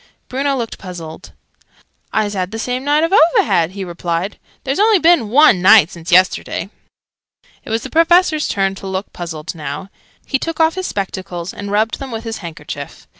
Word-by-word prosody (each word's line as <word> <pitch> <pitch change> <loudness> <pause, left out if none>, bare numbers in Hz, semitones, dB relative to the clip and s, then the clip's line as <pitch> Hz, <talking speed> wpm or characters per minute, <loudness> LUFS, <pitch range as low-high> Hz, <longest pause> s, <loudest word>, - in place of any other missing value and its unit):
Bruno 275 +2 0
looked 230 -3 -5
puzzled. 175 -4 -9 0.8
"I's 210 -1 0
had 185 -2 -2
the 220 - -6
same 250 +3 -3
night 295 +2 +2
oo've 370 +4 +4
had," 170 +1 +1
he 200 -1 -5
replied. 175 +2 -3 0.2
"There's 270 +4 -2
only 430 0 +5
been 330 - +3
one 250 -7 +5
night 190 -3 +6
since 170 +1 -8
yesterday!" 185 +2 +2 0.9
It - - -11
was 225 +1 -1
the 265 - -8
Professor's 330 -1 +3
turn 195 -1 0
to 195 0 -9
look 190 +1 -4
puzzled 165 -2 -6
now. 150 +4 -6 0.3
He 270 - -1
took 330 +2 -4
off 320 0 +4
his 375 -1 -4
spectacles, 190 -2 -5
and 200 0 -7
rubbed 215 +2 0
them 275 -1 -6
with 225 -2 -5
his 225 -1 -5
handkerchief. 150 -5 -8
205 Hz, 175 wpm, -17 LUFS, 180-285 Hz, 0.9 s, night